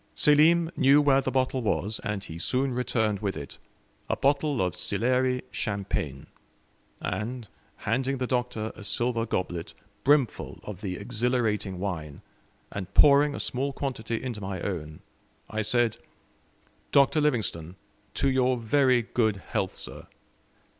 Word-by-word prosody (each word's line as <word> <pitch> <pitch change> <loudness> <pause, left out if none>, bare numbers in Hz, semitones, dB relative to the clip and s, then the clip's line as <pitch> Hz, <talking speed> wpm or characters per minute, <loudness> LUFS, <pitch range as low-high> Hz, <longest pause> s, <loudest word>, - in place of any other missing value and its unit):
Selim 165 +3 +5
knew 140 +2 +5
where 140 -2 +4
the - - -2
bottle 130 0 0
was, 105 -1 -1
and 105 -2 -3
he 80 -2 -8
soon 130 +8 0
returned 110 -4 0
with 100 -2 -2
it 70 - -8 0.5
a - - +2
bottle 140 0 +1
of 90 -2 0
Sillery 125 +1 +1
champagne; 100 - -3 0.7
and, 115 +1 -4 0.3
handing 130 +5 -1
the 130 - -1
Doctor 125 -3 -2
a 110 - -10
silver 120 +2 0
goblet 85 -5 -3 0.3
brimful 140 -3 +2
of 105 -4 -8
the 95 -3 -3
exhilarating 110 -2 -1
wine, 80 -7 -5 0.5
and 95 -3 -5
pouring 145 0 +6
a - - -5
small 135 +3 -1
quantity 125 -4 -3
into 120 -5 -4
my 95 -1 -4
own, 80 -6 -4 0.5
I 110 0 -1
said, 115 +1 +2 0.9
"Dr. 140 +2 +4
Livingstone, 105 - -1 0.4
to - - +1
your 130 -1 +2
very 125 +1 +3
good 110 -2 +1 0.2
health, - - -1
sir." - - -8
120 Hz, 135 wpm, -27 LUFS, 100-130 Hz, 0.9 s, pouring